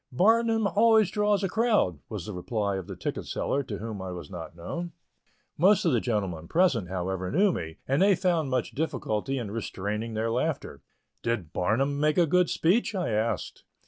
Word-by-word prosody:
Barnum 225 Hz, -, +3 dB
always 220 Hz, 0 st, +4 dB
draws 210 Hz, -1 st, +1 dB
a -, -, +2 dB
crowd," 215 Hz, -, +1 dB
was 105 Hz, -6 st, -5 dB
the 105 Hz, -, -6 dB
reply 100 Hz, +2 st, -2 dB
of 95 Hz, -, -6 dB
the -, -, -6 dB
ticket -, -, -4 dB
seller, 140 Hz, -, -1 dB
to 115 Hz, -7 st, -5 dB
whom 110 Hz, -2 st, -6 dB
I 95 Hz, -, -5 dB
was 90 Hz, +2 st, -8 dB
not 85 Hz, -2 st, -8 dB
known. 170 Hz, -, -5 dB, 0.7 s
Most 190 Hz, +4 st, +5 dB
of 165 Hz, -, +4 dB
the 120 Hz, -, +3 dB
gentlemen 95 Hz, -9 st, -2 dB
present, 135 Hz, -, +2 dB
however, 95 Hz, 0 st, -3 dB
knew 195 Hz, +6 st, +3 dB
me, 80 Hz, -1 st, -5 dB
and 135 Hz, +4 st, +2 dB
they 195 Hz, 0 st, +5 dB
found 170 Hz, -5 st, +1 dB
much 130 Hz, -2 st, -1 dB
difficulty 135 Hz, -4 st, -2 dB
in 115 Hz, -6 st, -4 dB
restraining 105 Hz, +1 st, -4 dB
their 115 Hz, +1 st, 0 dB
laughter. 125 Hz, -, -2 dB, 0.4 s
"Did 105 Hz, -9 st, -2 dB
Barnum 135 Hz, +10 st, +1 dB
make 150 Hz, +2 st, +2 dB
a 175 Hz, -, +5 dB
good 180 Hz, +2 st, +3 dB
speech?" 205 Hz, +6 st, +1 dB
I 180 Hz, -2 st, -1 dB
asked. 110 Hz, +2 st, -2 dB
125 Hz, 185 wpm, -27 LUFS, -, 0.7 s, Most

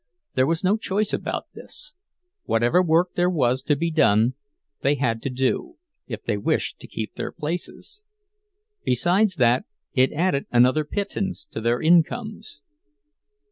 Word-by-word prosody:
There 130 Hz, +1 st, +2 dB
was 165 Hz, +2 st, 0 dB
no 195 Hz, +4 st, +3 dB
choice 210 Hz, -1 st, -1 dB
about -, -, -2 dB
this—whatever 300 Hz, -, -2 dB
work 175 Hz, +1 st, +2 dB
there 175 Hz, 0 st, +2 dB
was 130 Hz, -7 st, +1 dB
to 150 Hz, +2 st, +1 dB
be 165 Hz, +4 st, -1 dB
done 115 Hz, -6 st, +3 dB, 0.5 s
they 140 Hz, +2 st, +2 dB
had 115 Hz, -5 st, -1 dB
to -, -, -3 dB
do, 135 Hz, -, -1 dB, 0.3 s
if 110 Hz, -3 st, -6 dB
they 110 Hz, -3 st, -1 dB
wished 100 Hz, -, -1 dB
to -, -, -11 dB
keep 110 Hz, -1 st, -5 dB
their -, -, -5 dB
places; 175 Hz, -, -6 dB, 0.8 s
besides 180 Hz, -, +2 dB
that, 125 Hz, -, +3 dB, 0.3 s
it 130 Hz, 0 st, +3 dB
added 155 Hz, -3 st, 0 dB
another 130 Hz, +5 st, +4 dB
pittance 200 Hz, -, -3 dB
to -, -, -5 dB
their 120 Hz, +2 st, +1 dB
incomes. 175 Hz, +2 st, +1 dB
155 Hz, 140 wpm, -24 LUFS, 125-195 Hz, 0.8 s, another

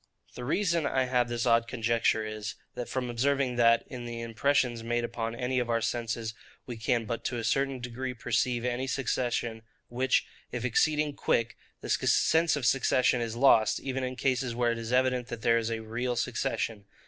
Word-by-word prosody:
The 125 Hz, -, -7 dB
reason 170 Hz, 0 st, +1 dB
I 130 Hz, -1 st, +1 dB
have 125 Hz, -1 st, +1 dB
for -, -, -11 dB
this 120 Hz, 0 st, -1 dB
odd 115 Hz, -1 st, +3 dB
conjecture 115 Hz, -2 st, +1 dB
is, 110 Hz, +1 st, -5 dB, 0.3 s
from 130 Hz, -1 st, -2 dB
observing 135 Hz, +1 st, +1 dB
that, 115 Hz, -1 st, +5 dB
in 125 Hz, -1 st, -8 dB
the 120 Hz, 0 st, -5 dB
impressions 120 Hz, +1 st, +1 dB
made 120 Hz, +1 st, -1 dB
upon 115 Hz, -1 st, -3 dB
any 125 Hz, +1 st, -1 dB
of 120 Hz, -1 st, -2 dB
our 115 Hz, 0 st, +2 dB
senses, 115 Hz, -1 st, -2 dB, 0.3 s
we 120 Hz, -, -6 dB
can 115 Hz, +1 st, 0 dB
but 115 Hz, +1 st, -4 dB
to 125 Hz, -, -1 dB
a 115 Hz, -, -3 dB
certain 135 Hz, +2 st, 0 dB
degree 125 Hz, +1 st, -5 dB
perceive 120 Hz, +1 st, 0 dB
any 125 Hz, +2 st, -1 dB
succession; 120 Hz, -3 st, -1 dB, 0.3 s
which, 130 Hz, +2 st, +1 dB, 0.3 s
if 125 Hz, 0 st, -3 dB
exceeding 150 Hz, +4 st, +2 dB
quick, 115 Hz, 0 st, 0 dB, 0.3 s
the -, -, -7 dB
sense 160 Hz, 0 st, +3 dB
of 145 Hz, -4 st, -3 dB
succession 125 Hz, -1 st, +3 dB
is 115 Hz, -1 st, -3 dB
lost, 120 Hz, -4 st, +4 dB
even 135 Hz, -1 st, -3 dB
in 130 Hz, 0 st, -3 dB
cases 125 Hz, -2 st, 0 dB
where 120 Hz, -1 st, +2 dB
it 115 Hz, -, -3 dB
is 115 Hz, +1 st, -5 dB
evident 125 Hz, -1 st, +2 dB
that 115 Hz, -4 st, -7 dB
there 115 Hz, -1 st, +4 dB
is 115 Hz, 0 st, -2 dB
a 115 Hz, -1 st, -3 dB
real 120 Hz, +3 st, -2 dB
succession. 110 Hz, -2 st, -2 dB
120 Hz, 190 wpm, -29 LUFS, 115-130 Hz, 0.3 s, that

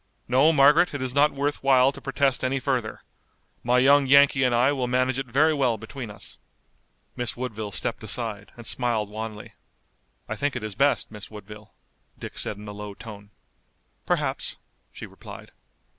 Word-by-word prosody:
No, 135 Hz, +6 st, +4 dB
Margaret, 150 Hz, +3 st, +4 dB
it 140 Hz, -, -4 dB
is 130 Hz, -1 st, -3 dB
not 145 Hz, +2 st, +4 dB
worth 145 Hz, +1 st, -2 dB
while 135 Hz, -1 st, +4 dB
to 140 Hz, 0 st, -12 dB
protest 135 Hz, -1 st, 0 dB
any 130 Hz, +1 st, 0 dB
further. 125 Hz, -5 st, -2 dB, 0.6 s
My 125 Hz, +1 st, +2 dB
young 140 Hz, +2 st, +5 dB
Yankee 140 Hz, 0 st, +5 dB
and 125 Hz, -2 st, +2 dB
I 125 Hz, +4 st, +3 dB
will 130 Hz, -3 st, -2 dB
manage 130 Hz, +1 st, 0 dB
it 135 Hz, -, -4 dB
very 150 Hz, +6 st, +3 dB
well 130 Hz, -6 st, +1 dB
between 115 Hz, +2 st, -8 dB
us." 105 Hz, -1 st, -11 dB, 0.8 s
Miss 120 Hz, -2 st, -2 dB
Woodville 110 Hz, -4 st, -5 dB
stepped -, -, -3 dB
aside 110 Hz, -1 st, -2 dB
and 120 Hz, -, -11 dB
smiled 115 Hz, -5 st, 0 dB
wanly. 110 Hz, -1 st, -7 dB, 0.7 s
"I -, -, -4 dB
think 145 Hz, -2 st, -2 dB
it 120 Hz, -, -4 dB
is 110 Hz, -2 st, -4 dB
best, 140 Hz, +4 st, +1 dB
Miss 105 Hz, -2 st, -10 dB
Woodville," 105 Hz, 0 st, -12 dB, 0.4 s
Dick -, -, -7 dB
said 105 Hz, -, -2 dB
in 105 Hz, +1 st, -11 dB
a -, -, -6 dB
low 105 Hz, -1 st, -8 dB
tone. 105 Hz, -3 st, -11 dB, 0.8 s
"Perhaps," -, -, -1 dB, 0.3 s
she -, -, -9 dB
replied. -, -, -12 dB
125 Hz, 175 wpm, -25 LUFS, 110-140 Hz, 0.8 s, young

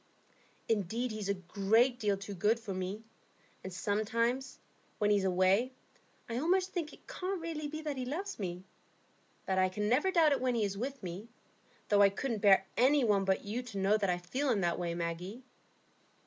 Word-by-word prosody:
"Indeed, 225 Hz, +3 st, 0 dB
he's 215 Hz, -2 st, -4 dB
a 200 Hz, -, +2 dB
great 215 Hz, +7 st, +2 dB
deal 205 Hz, -3 st, +1 dB
too 200 Hz, +1 st, -7 dB
good 210 Hz, +5 st, +2 dB
for 220 Hz, -4 st, -5 dB
me. 185 Hz, +4 st, -4 dB, 0.6 s
And 190 Hz, -, -6 dB
sometimes, 230 Hz, +7 st, -1 dB, 0.4 s
when 210 Hz, -1 st, +2 dB
he 205 Hz, -, +5 dB
is 195 Hz, -, 0 dB
away, 190 Hz, +7 st, +2 dB, 0.5 s
I 235 Hz, 0 st, -2 dB
almost 365 Hz, +5 st, +2 dB
think 330 Hz, -4 st, -2 dB
it -, -, -17 dB
can't 380 Hz, 0 st, -3 dB
really 325 Hz, -2 st, -4 dB
be 310 Hz, +2 st, -6 dB
that 295 Hz, -3 st, -3 dB
he 255 Hz, -, -3 dB
loves 340 Hz, -, -4 dB
me. 180 Hz, -2 st, -4 dB, 0.8 s
But 190 Hz, 0 st, +1 dB
I 185 Hz, 0 st, +3 dB
can 210 Hz, +3 st, -2 dB
never 260 Hz, -, +3 dB
doubt 330 Hz, -5 st, +4 dB
it 280 Hz, -, +1 dB
when 255 Hz, -1 st, +1 dB
he 225 Hz, -, +1 dB
is 200 Hz, -1 st, -1 dB
with 265 Hz, +3 st, -5 dB
me, 185 Hz, +5 st, -6 dB, 0.6 s
though 205 Hz, -1 st, +5 dB
I 200 Hz, -, +7 dB
couldn't 220 Hz, +2 st, -3 dB
bear 195 Hz, -2 st, +6 dB
any 270 Hz, +3 st, +4 dB
one 205 Hz, -4 st, +3 dB
but 190 Hz, +1 st, +1 dB
you 220 Hz, +5 st, -2 dB
to 245 Hz, -5 st, -8 dB
know 195 Hz, +2 st, +3 dB
that 205 Hz, -3 st, 0 dB
I 175 Hz, -, +1 dB
feel 255 Hz, +11 st, -2 dB
in 215 Hz, -6 st, +2 dB
that 170 Hz, -1 st, 0 dB
way, 170 Hz, -1 st, -2 dB
Maggie." 175 Hz, +8 st, -4 dB
215 Hz, 200 wpm, -32 LUFS, 195-260 Hz, 0.8 s, I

